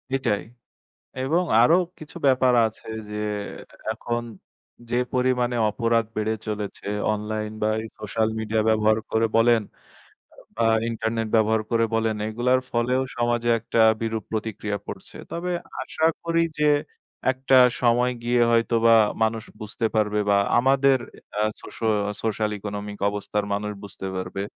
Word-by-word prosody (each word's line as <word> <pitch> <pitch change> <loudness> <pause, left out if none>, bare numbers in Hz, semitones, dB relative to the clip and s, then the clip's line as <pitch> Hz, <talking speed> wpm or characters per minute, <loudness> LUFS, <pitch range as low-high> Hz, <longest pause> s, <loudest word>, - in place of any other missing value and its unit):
এটাই। 115 -7 0 0.8
এবং 165 +7 +2 0.2
আরো 160 +8 +6 0.2
কিছু 155 +2 -10
ব্যাপার 130 -1 +4
আছে 110 - -12 0.2
যে, 105 - -6 0.8
এখন 120 +1 -3 0.7
যে, 120 - 0 0.2
পরিমাণে 125 -1 +1 0.2
অপরাধ 115 +1 +1
বেড়ে 110 +1 0
চলেছে 105 -2 -5 0.3
অনলাইন 105 0 -3
বা 110 - +2
এই 110 - -6
সোশ্যাল 110 +1 0
মিডিয়া 110 0 0
ব্যবহার 110 0 +3
করে 115 0 +2
বলেন 115 0 +5 0.7
আ - - -23 0.2
বা 115 0 +2 0.2
ইন্টারনেট 115 0 -2
ব্যবহার 110 0 +3
করে 115 -1 +3
বলেন, 110 -1 +1
এগুলোর 125 +3 +1
ফলেও 125 +2 +1
সমাজে 120 0 +1
একটা 115 0 0 0.2
বিরূপ 110 -1 -2
প্রতিক্রিয়া 105 -2 -3
পড়ছে। - - -9 0.2
তবে 175 +2 -3 0.3
আশা 160 +4 0 0.2
করি 165 0 +1 0.2
যে, 150 - +3 0.6
একটা 130 0 +3 0.2
সময় 125 +1 +3
গিয়ে 120 0 +2
হয়তোবা 115 0 +4 0.3
মানুষ 110 0 0 0.2
বুঝতে 110 +2 -2
পারবে 105 -1 +1
বা 100 - +5 0.2
আমাদের 135 +1 +4 0.4
আ - - +3 0.2
সোশো 115 - -6 0.2
আ - - -3
social 110 -1 0
economic 105 0 -6
অবস্থার 105 0 -2
মানুষ 105 +1 -3
বুঝতে 100 -1 -7
পারবে। 95 +1 -4
115 Hz, 135 wpm, -24 LUFS, 110-125 Hz, 0.8 s, আরো